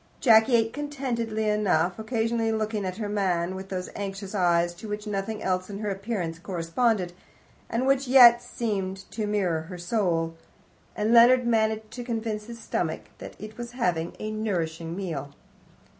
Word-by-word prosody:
Jacky 225 0 +6
ate 225 -1 +2
contentedly 245 -7 -2
enough, 195 -4 +1
occasionally 225 0 0
looking 215 -2 -1
at 185 0 -4
her 215 -2 -3
man 185 -4 0
with 190 0 -7
those 185 -1 -3
anxious 195 0 -5
eyes, 175 -3 +2
to 210 +5 -10
which 210 +1 -4
nothing 210 +1 -3
else 185 0 -1
in 200 - -5
her 210 -1 -2
appearance 195 -5 -3
corresponded, 180 +2 0 0.6
and 235 +3 0
which 270 0 +2
yet 245 -2 +8
seemed 195 -4 -3
to 215 -2 -3
mirror 185 -6 0
her 180 - -6
soul. 175 -3 0 0.6
And 215 +2 +1
Leonard 245 +1 +7
managed 220 -1 +1
to 245 +1 -6
convince 225 -3 -3
his 235 -1 -8
stomach 230 - -3
that - - -9
it 215 +2 -10
was 240 0 -6
having 175 -9 -1
a 215 - -4
nourishing 170 -6 -2
meal. 145 -7 -5
210 Hz, 160 wpm, -26 LUFS, 185-230 Hz, 0.6 s, yet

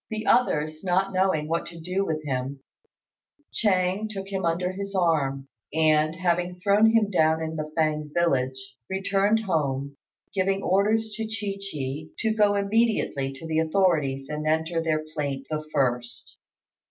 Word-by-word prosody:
The 220 0 -4
others 155 -9 +2
not 190 +1 +1
knowing 185 -5 +1
what 165 +1 -1
to 170 -1 -9
do 180 +4 -1
with 155 -4 -2
him, 135 0 -3 0.9
Ch'êng 190 0 +1
took 195 -2 -6
him 190 -2 -2
under 175 +2 0
his 200 +1 -6
arm, 140 -7 +1 0.3
and, 155 0 +3
having 180 0 0
thrown 205 +3 +4
him 215 -3 +3
down 160 -3 +3
in 160 0 -4
the 155 -1 -4
Fêng 155 -1 +1
village, 130 -5 -1
returned 195 +3 +1
home, 140 -6 -1 0.4
giving 195 0 0
orders 215 +4 +2
to 225 - -2
Chi 210 -3 -4
chi 145 +2 -4
to 220 -1 0
go 205 -2 +4
immediately 200 -9 +1
to 135 +4 -10
the 160 0 0
authorities 155 -6 +1
and 150 +1 -4
enter 160 +2 +1
their 155 -1 0
plaint 140 -3 -3
the 155 0 -2
first. 125 -4 -1
165 Hz, 155 wpm, -26 LUFS, 150-195 Hz, 0.9 s, thrown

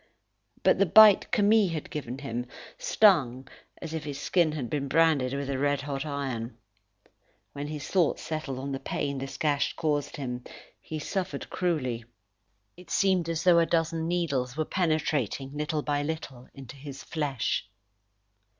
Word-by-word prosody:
But - - +4
the 195 - +4
bite 215 +2 +8
Camille 210 -3 +4
had 155 - -5
given 130 -4 -5
him 125 -3 -4 0.3
stung 160 - +3 0.3
as 160 - -6
if 160 -1 -3
his 145 -2 -5
skin 170 -2 +2
had 140 -6 -3
been 140 +2 -2
branded 150 -3 +3
with 140 -1 -3
a 135 -1 -2
red 145 0 +1
hot 140 +1 -4
iron. 130 -5 -4 1.0
When 145 +1 -5
his 150 -2 -6
thoughts 180 -5 +1
settled 155 -4 -4
on 135 +2 -4
the 135 - -3
pain 140 -1 -3
this 135 +1 -6
gash 145 -3 +1
caused 150 0 -1
him, 125 -3 -4 0.4
he 155 - -6
suffered 185 +4 -4
cruelly. 130 -10 -1 0.7
It 180 0 -15
seemed 185 -4 +2
as 165 0 -1
though 175 -2 +6
a 165 - +3
dozen 165 -1 0
needles 140 -7 -1
were 155 - 0
penetrating 150 - -1
little 150 0 -2
by 145 -1 0
little 145 -5 -5
into 135 0 -10
his 135 -1 -9
flesh. 140 -9 -2
145 Hz, 160 wpm, -28 LUFS, 135-165 Hz, 1.0 s, bite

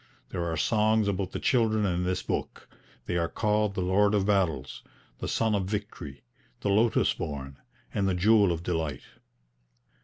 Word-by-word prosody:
There 85 -1 -2
are 80 - -2
songs 110 +4 +2
about 95 -1 -1
the - - -4
children 110 -4 +2
in 90 -1 0
this 90 0 -1
book; - - -4 0.4
they 85 - -1
are 85 -1 +1
called 105 -1 0
the 95 - -1
Lord 100 +3 +3
of 100 -2 +1
Battles, 90 -10 0 0.4
the - - -4
Sun 110 -1 +1
of 100 -2 0
Victory, 100 -9 -6 0.4
the 100 - -1
Lotus 110 +3 +3
born, 70 -2 -6 0.4
and 100 -3 +1
the 90 - 0
Jewel 100 +1 +4
of 85 0 -3
Delight. 80 -5 -2
100 Hz, 165 wpm, -28 LUFS, 85-105 Hz, 0.4 s, Jewel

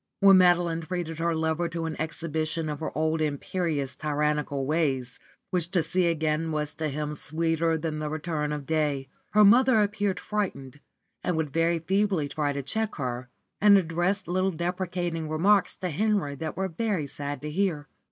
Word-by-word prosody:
When 195 -1 +7
Madeline 175 -2 +3
treated 165 -1 -4
her 170 0 +1
lover 160 +2 0
to 165 0 -3
an 160 -1 -3
exhibition 160 0 -2
of 150 -1 -4
her 160 - -3
old 160 0 +1
imperious 150 -1 -2
tyrannical 150 -2 -1
ways, 135 -5 -1 0.3
which 175 -2 +1
to 180 -3 +2
see 175 +3 +1
again 160 0 0
was 150 -1 -2
to 155 -1 -2
him 150 +1 -3
sweeter 165 +2 0
than 155 -1 -3
the 150 0 -3
return 155 -1 -2
of 150 -2 -4
day, 145 -4 0 0.2
her 210 0 +7
mother 245 +3 +6
appeared 205 -2 0
frightened, 150 -10 -3 0.4
and 180 -3 0
would 150 -3 -2
try 165 +1 +2
feebly 190 -2 +1
to 145 -1 -2
check 220 +9 -2
her, 125 -3 -4 0.3
and 205 -1 +8
address 175 +3 0
little 185 +2 +1
deprecating 175 -2 -3
remarks 195 +6 +3
to 180 -2 -3
Henry 200 -3 0
that 155 +2 -5
were 190 0 0
very 190 -2 -1
sad 145 0 -4
to 150 - -4
hear. 165 -4 -1
160 Hz, 170 wpm, -27 LUFS, 150-180 Hz, 0.4 s, and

